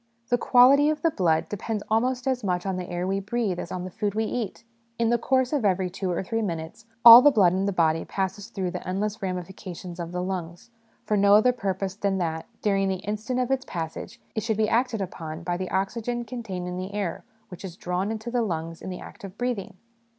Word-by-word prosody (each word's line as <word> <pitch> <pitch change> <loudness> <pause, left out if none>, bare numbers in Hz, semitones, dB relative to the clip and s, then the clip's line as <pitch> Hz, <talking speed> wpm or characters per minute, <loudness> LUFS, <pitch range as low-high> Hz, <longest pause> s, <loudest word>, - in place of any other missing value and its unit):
The 245 - +3
quality 270 +5 +6
of 310 0 -2
the 330 - +3
blood 165 - +1
depends 205 +1 -4
almost 250 +3 +1
as 255 -2 0
much 180 -2 -1
on 190 -1 -1
the 180 -1 -5
air 175 0 -2
we 195 +1 0
breathe 210 -2 -2
as 175 - -6
on 180 - -4
the 185 - -6
food 205 +2 -2
we 220 - +1
eat; 225 -1 -4 0.3
in 230 0 +2
the 240 - +2
course 260 +2 +1
of 285 -5 +1
every 185 -2 +1
two 190 0 -3
or 175 +1 -1
three 225 +4 -2
minutes, 170 +3 -5 0.2
all 235 +1 +13
the 290 - +7
blood 195 -10 +4
in 190 +1 0
the - - +1
body 165 -3 +2
passes 195 +1 -3
through 190 -5 -3
the - - -6
endless 205 +3 -2
ramifications 180 -1 -6
of 170 -1 -5
the 180 0 -2
lungs, 180 +2 -5 0.3
for 210 - +1
no 200 0 +6
other 250 +4 +5
purpose 195 -4 -2
than 195 -1 -1
that, 160 -3 -2 0.2
during 195 -2 +2
the 190 - 0
instant 215 +5 -2
of 250 +1 0
its 265 -1 +1
passage, 170 +6 -6
it 220 - -1
should 220 -1 -1
be 220 -1 +2
acted 235 -1 +1
upon 165 -2 -7
by 175 0 -1
the 185 +1 -4
oxygen 235 +5 -2
contained 215 -7 -5
in 180 0 -4
the 190 +2 -5
air 200 -5 -3 0.3
which 180 - -10
is 180 -2 -7
drawn 180 +3 -2
into 220 +2 -4
the 245 -1 +1
lungs 165 -5 -3
in - - -6
the 180 - -5
act - - -12
of 195 +1 -9
breathing. 245 -7 -3
195 Hz, 230 wpm, -26 LUFS, 180-230 Hz, 0.3 s, all